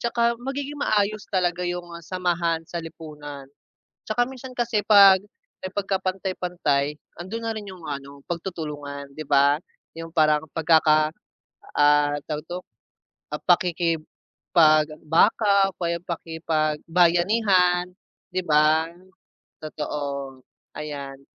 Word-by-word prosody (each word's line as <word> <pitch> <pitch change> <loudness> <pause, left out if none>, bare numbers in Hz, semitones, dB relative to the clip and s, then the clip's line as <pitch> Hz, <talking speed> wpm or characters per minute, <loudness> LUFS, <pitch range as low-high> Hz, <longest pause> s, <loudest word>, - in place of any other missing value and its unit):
'Tsaka 235 0 +1
magiging 275 +4 -5
maayos 215 -6 0
talaga 180 -2 0
'yong, 175 0 -3
ah, 170 - -12
samahan 175 -2 -1
sa 170 - -4
lipunan. 145 -4 -9 0.6
'Tsaka 230 +3 +1
minsan 260 0 -9
kasi 235 -3 +1
'pag, 200 -2 +7 0.4
eh, 185 - -4
pagkapantay-pantay 185 -7 -1 0.2
ando'n 225 +6 -6
na 225 - -1
rin 210 -2 -7
'yong, 185 -3 -11
ano, 140 -1 -7
pagtutulungan, 150 -5 -6
'di 155 - -6
ba, 145 +1 +4 0.3
'yong 165 0 -8
parang 155 -2 +3
pagkaka 155 -1 +3 0.6
ah, 145 0 +4
tawag 150 -1 -3
dito, 180 +1 -4 0.7
ah, 150 - -3
pakikipagbaka 165 +2 +2
o - - -53
kaya 170 -1 -1
pakipagbayanihan, 175 +4 +1 0.5
'di 185 - 0
ba? 155 +1 +3 0.7
Totoo, 140 -3 -5 0.4
ayan. 140 -3 -6
170 Hz, 105 wpm, -24 LUFS, 150-190 Hz, 0.7 s, pag